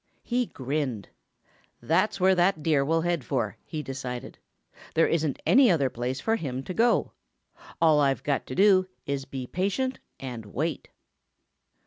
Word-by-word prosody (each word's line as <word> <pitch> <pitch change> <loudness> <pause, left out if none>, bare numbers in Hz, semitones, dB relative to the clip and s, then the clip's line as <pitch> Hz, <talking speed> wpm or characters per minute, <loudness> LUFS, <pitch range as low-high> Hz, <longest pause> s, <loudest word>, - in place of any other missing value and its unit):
He 245 -1 0
grinned. 130 -6 -3 0.7
"That's 185 +6 +1
where 190 +1 +5
that 175 -3 +2
Deer 150 -3 +3
will 165 +3 +1
head 170 -4 -1
for," 115 -6 -2
he 155 -2 -5
decided. 130 -1 -6 0.6
"There 165 - +5
isn't 155 -4 0
any 260 -2 +6
other 140 -8 +2
place 125 +2 -3
for 225 +7 +1
him 135 - -4
to 185 - -5
go. 235 +4 +2 0.7
All 160 -2 +5
I've 140 -2 +1
got 140 -2 -1
to 130 - -5
do 190 -2 +5 0.2
is 140 -1 -3
be 135 -2 -6
patient 200 - -1 0.2
and 120 -5 -7
wait." 155 +10 -3
150 Hz, 150 wpm, -27 LUFS, 130-185 Hz, 0.7 s, any